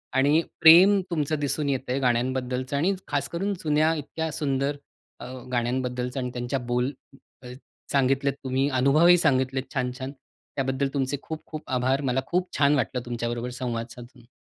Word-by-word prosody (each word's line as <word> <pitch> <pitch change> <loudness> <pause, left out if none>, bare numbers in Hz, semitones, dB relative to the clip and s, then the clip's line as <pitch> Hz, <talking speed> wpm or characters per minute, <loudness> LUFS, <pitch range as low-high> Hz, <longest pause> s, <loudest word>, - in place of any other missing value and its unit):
आणि 145 +4 +4 0.2
प्रेम 180 +5 +8
तुमचं 155 -2 -1
दिसून 145 0 -1
येतंय 130 -1 -1
गाण्यांबद्दलचं 130 +1 -1
आणि 175 +7 +2
खासकरून 195 +4 -2
जुन्या 155 +1 +2
इतक्या 160 +2 -4
सुंदर 140 -1 -1 0.4
अ, - - -8 0.3
गाण्यांबद्दलचं 125 +1 -1
आणि 125 - -3
त्यांच्या 120 +2 -2
बोल 125 +2 -1 0.5
अ, - - -9 0.4
सांगितलेत 135 0 +2
तुम्ही, 135 +1 0
अनुभवही 145 +7 +5
सांगितलेत 130 -4 +1
छान-छान. 130 0 -3 0.4
त्याबद्दल 135 0 0
तुमचे 140 0 -1
खूप-खूप 155 -1 -7
आभार. 130 +2 +1
मला 130 -1 0
खूप 180 +1 0
छान 145 0 +4
वाटलं 130 -2 -1
तुमच्याबरोबर 120 0 -3
संवाद 115 -2 -3
साधून. 120 0 -13
135 Hz, 135 wpm, -25 LUFS, 125-150 Hz, 0.5 s, प्रेम